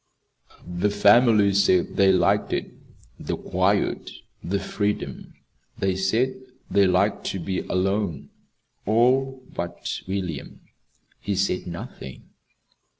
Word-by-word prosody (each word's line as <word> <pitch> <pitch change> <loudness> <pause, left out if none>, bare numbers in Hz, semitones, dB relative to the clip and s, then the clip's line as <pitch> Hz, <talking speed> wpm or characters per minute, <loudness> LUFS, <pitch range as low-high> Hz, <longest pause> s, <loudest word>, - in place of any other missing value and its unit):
The 90 +3 -1
family 105 0 +5
said 95 -2 +2
they 95 -1 +5
liked 95 - +2
it - - -2 0.5
the - - -3
quiet, - - 0 0.3
the 100 +3 -1
freedom. 105 +1 -3 0.4
They 95 -1 0
said 110 +8 +1 0.4
they 100 -1 +4
liked 90 - +1
to 95 - -3
be 95 +2 -2
alone 95 -4 -1 0.6
all 130 +4 +2
but 85 0 -4
William. 90 -7 -4 0.6
He 100 -1 -2
said 95 -1 0
nothing. 85 -6 -9
100 Hz, 105 wpm, -24 LUFS, 90-105 Hz, 0.6 s, family